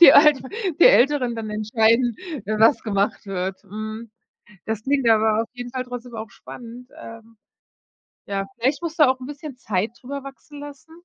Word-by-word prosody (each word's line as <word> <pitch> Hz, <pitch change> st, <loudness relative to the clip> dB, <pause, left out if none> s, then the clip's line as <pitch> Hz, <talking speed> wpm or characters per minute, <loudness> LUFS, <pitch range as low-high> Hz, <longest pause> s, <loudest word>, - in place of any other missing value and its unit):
die 340 Hz, -, +11 dB
Alter 285 Hz, -3 st, +6 dB, 0.3 s
die -, -, +8 dB
Älteren 275 Hz, -, +5 dB
dann 220 Hz, -1 st, -5 dB
entscheiden, 220 Hz, +3 st, +2 dB, 0.3 s
was 220 Hz, +5 st, +3 dB
gemacht 200 Hz, -1 st, -1 dB
wird. 190 Hz, -1 st, -3 dB
Mhm. 215 Hz, +2 st, -7 dB, 0.5 s
Das 220 Hz, -1 st, -3 dB
klingt 270 Hz, -1 st, +1 dB
aber 220 Hz, 0 st, +4 dB
auf 230 Hz, -, -9 dB
jeden 245 Hz, -1 st, -7 dB
Fall 255 Hz, 0 st, -3 dB
trotzdem 245 Hz, -1 st, -8 dB
auch 220 Hz, -1 st, -6 dB
spannend, 235 Hz, +5 st, -11 dB
ähm. 230 Hz, 0 st, -12 dB, 0.9 s
Ja, 195 Hz, -1 st, -1 dB
vielleicht 265 Hz, +5 st, 0 dB
musst 335 Hz, -1 st, -5 dB
du 300 Hz, -, +8 dB
auch 260 Hz, 0 st, 0 dB
'n -, -, -6 dB
bisschen 290 Hz, 0 st, -8 dB
Zeit 210 Hz, -3 st, -1 dB
darüber 280 Hz, +2 st, -6 dB
wachsen 285 Hz, +2 st, -11 dB
lassen 290 Hz, +2 st, -11 dB
235 Hz, 170 wpm, -23 LUFS, 215-270 Hz, 0.9 s, die